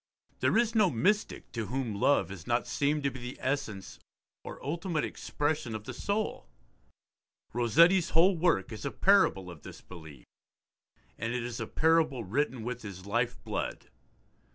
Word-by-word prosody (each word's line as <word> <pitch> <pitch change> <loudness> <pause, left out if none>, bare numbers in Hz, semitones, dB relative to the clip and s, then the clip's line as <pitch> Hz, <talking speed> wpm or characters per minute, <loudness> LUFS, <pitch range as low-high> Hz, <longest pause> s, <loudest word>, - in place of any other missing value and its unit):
There - - +2
is 230 -1 +2
no 215 -5 +4
mystic 205 - 0
to 115 -3 -4
whom 125 -1 -2
love 100 +5 +2
has 90 -5 -9
not 120 0 +1
seemed 145 +1 0
to 140 - +1
be 130 - -8
the 125 +1 -7
essence 110 -8 -3 0.4
or - - -8
ultimate 165 +2 -1
expression 145 -6 -2
of 110 - -6
the - - -7
soul. 200 - -2 1.1
Rossetti's 165 - +4
whole 180 +4 +5
work 165 - +1
is 110 - -7
a 140 - -1
parable 140 - +3
of 85 - -12
this - - -10
belief, 80 -8 -12 0.9
and 115 +1 -2
it 125 - -2
is 120 -1 -5
a - - -3
parable 160 -6 +2
written 130 +3 -1
with 125 +1 -4
his 95 -3 -9
life 120 +4 0
blood. - - -4
125 Hz, 160 wpm, -30 LUFS, 110-165 Hz, 1.1 s, whole